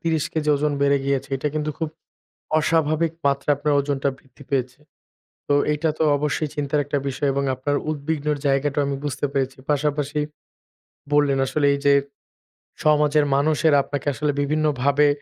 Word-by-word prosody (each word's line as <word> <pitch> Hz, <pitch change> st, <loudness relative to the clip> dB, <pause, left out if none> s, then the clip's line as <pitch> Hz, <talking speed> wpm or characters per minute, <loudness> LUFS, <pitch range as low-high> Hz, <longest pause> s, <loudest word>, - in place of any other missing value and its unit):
৩০ 160 Hz, -2 st, 0 dB
KG 150 Hz, -1 st, -1 dB
ওজন 150 Hz, +1 st, 0 dB
বেড়ে 140 Hz, 0 st, +3 dB
গিয়েছে। 140 Hz, 0 st, -1 dB
এটা 150 Hz, +3 st, -2 dB
কিন্তু 155 Hz, 0 st, -1 dB
খুব 160 Hz, -2 st, -1 dB, 0.7 s
অস্বাভাবিক 155 Hz, 0 st, +1 dB
মাত্রায় 140 Hz, +1 st, +2 dB
আপনার 145 Hz, 0 st, 0 dB
ওজনটা 140 Hz, -1 st, 0 dB
বৃদ্ধি 135 Hz, +2 st, -18 dB
পেয়েছে। 130 Hz, 0 st, -1 dB, 0.7 s
তো 145 Hz, -, +2 dB, 0.2 s
এইটা 155 Hz, +2 st, 0 dB
তো -, -, +1 dB
অবশ্যই 150 Hz, +1 st, -1 dB
চিন্তার 145 Hz, 0 st, 0 dB
একটা 145 Hz, 0 st, -1 dB
বিষয় 135 Hz, +1 st, -1 dB
এবং 140 Hz, 0 st, 0 dB
আপনার 145 Hz, +3 st, -1 dB
উদ্বিগ্নের 150 Hz, 0 st, -2 dB
জায়গাটাও 140 Hz, +1 st, +1 dB
আমি 140 Hz, -, -1 dB
বুঝতে 145 Hz, 0 st, -2 dB
পেরেছি। 135 Hz, -1 st, -1 dB
পাশাপাশি 145 Hz, 0 st, 0 dB, 0.9 s
বললেন, 145 Hz, -2 st, +3 dB
আসলে 145 Hz, +2 st, 0 dB
এই 140 Hz, -, -2 dB
যে 140 Hz, -, +6 dB, 0.9 s
সমাজের 150 Hz, 0 st, +3 dB
মানুষেরা 155 Hz, +1 st, +3 dB
আপনাকে 145 Hz, 0 st, -5 dB
আসলে 150 Hz, +1 st, 0 dB
বিভিন্ন 155 Hz, +2 st, 0 dB, 0.2 s
ভাবে, 140 Hz, +2 st, +4 dB
145 Hz, 155 wpm, -23 LUFS, 140-150 Hz, 0.9 s, যে